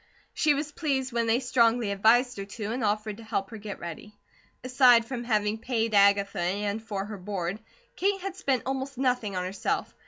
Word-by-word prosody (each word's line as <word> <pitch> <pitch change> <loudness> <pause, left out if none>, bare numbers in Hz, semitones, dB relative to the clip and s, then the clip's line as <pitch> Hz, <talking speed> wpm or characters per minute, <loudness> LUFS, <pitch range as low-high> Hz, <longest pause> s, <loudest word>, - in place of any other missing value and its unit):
She 300 -1 +3
was 295 +1 -3
pleased 270 -5 -2
when 235 -1 0
they 225 +2 +3
strongly 235 -3 +2
advised 235 +5 +3
her 195 - -5
to, 205 +1 -5
and 245 +1 -2
offered 210 0 -1
to 230 - -11
help 220 -2 -3
her 225 - -7
get 205 -1 -7
ready. 175 +5 -9 0.5
Aside 250 -2 +5
from 240 0 -5
having 215 -2 0
paid 230 -2 -1
Agatha, 200 -1 +4
and 200 +4 -1
for 205 -3 -4
her 210 -1 -7
board, 185 0 -3 0.4
Kate 395 +1 +1
had 385 0 -5
spent 270 -10 0
almost 265 0 -3
nothing 250 -6 0
on 180 - -1
herself. 185 +2 -2
225 Hz, 190 wpm, -27 LUFS, 205-255 Hz, 0.5 s, Aside